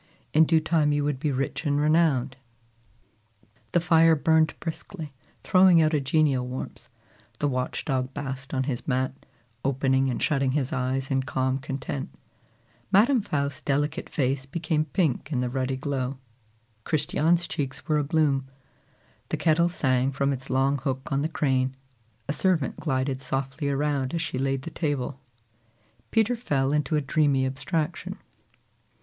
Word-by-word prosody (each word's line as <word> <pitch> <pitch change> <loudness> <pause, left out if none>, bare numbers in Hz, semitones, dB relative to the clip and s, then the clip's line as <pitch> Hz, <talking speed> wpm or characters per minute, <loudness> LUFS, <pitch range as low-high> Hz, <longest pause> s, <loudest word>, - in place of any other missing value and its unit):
In 160 +1 +6
due 160 0 +4
time 155 -2 +2
you 145 0 +1
would 145 -2 -1
be 150 +1 0
rich 135 +3 -2
and 145 -2 +1
renowned." 150 -4 +2 1.4
The 175 - +3
fire 165 -1 +5
burned 160 +1 +3
briskly, 160 -2 -6 0.3
throwing 185 -2 +6
out 155 0 +3
a 150 - +2
genial 135 -2 +2
warmth; 125 +1 -7 0.5
the 145 - 0
watch 130 -2 -2
dog 130 -2 -1
basked 135 -1 -6
on 130 -1 0
his 130 -3 -4
mat, 130 -1 0 0.5
opening 135 0 +2
and 125 - -2
shutting 135 -3 +1
his 135 -3 -1
eyes 135 +2 -1
in 135 0 +2
calm 130 0 -1
content; 135 0 -4 0.8
Madam 235 +6 +5
Faust's 140 -7 -2
delicate 145 +2 -1
face 135 -1 -1
became 155 +1 -1
pink 155 -4 -1
in 130 - 0
the 125 -1 -1
ruddy 130 0 -1
glow; 135 -1 -2 0.7
Christiane's 160 +4 +1
cheeks 140 -2 -4
were 155 -2 +2
abloom; 140 -3 +1 0.8
the - - -1
kettle 170 +1 +3
sang 130 -5 +1
from 140 +1 0
its 130 -1 -7
long 135 +2 +2
hook 135 -1 -3
on 140 0 +1
the 155 - -1
crane; 130 -4 0 0.5
a 145 - 0
servant 160 -2 +1
glided 130 -2 -1
softly 135 +2 -2
around 140 0 0
as 165 - -1
she 130 - -3
laid 135 0 -1
the 165 - -6
table. 140 -5 -2 0.9
Peter 225 +2 +2
fell 140 - 0
into 150 +1 +1
a 150 - +2
dreamy 140 -1 +2
abstraction. 150 +4 -3
140 Hz, 150 wpm, -26 LUFS, 130-155 Hz, 1.4 s, In